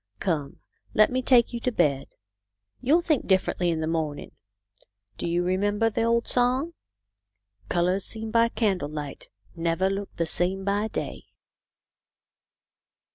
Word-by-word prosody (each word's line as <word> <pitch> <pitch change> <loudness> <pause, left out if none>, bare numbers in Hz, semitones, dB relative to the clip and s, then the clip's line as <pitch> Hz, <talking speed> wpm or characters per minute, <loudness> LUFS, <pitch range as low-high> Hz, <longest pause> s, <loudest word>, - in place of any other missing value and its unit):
" - - -45
Come, 150 -5 -2 0.4
let 215 +2 +5
me 255 +1 0
take 250 -2 +4
you 235 - -3
to 250 - -1
bed. 145 - +1 0.7
You'll 300 +7 +3
think 310 -6 0
differently 185 -2 +1
in 160 -1 -1
the - - -1
morning. 160 -2 -3 0.9
Do - - -2
you 170 +1 +1
remember 205 +5 +1
the 215 - -1
old 230 +1 +1
song? 255 +7 +1 0.5
" 100 0 -35
Colours 180 +2 +1
seen 220 -1 -4
by 230 0 +4
candle 195 -10 0
light 150 -2 -7 0.3
Never 170 +3 0
look 200 0 -4
the 170 - 0
same 180 +4 +1
by 205 +2 +1
day.' - - -5
190 Hz, 145 wpm, -26 LUFS, 165-230 Hz, 0.9 s, let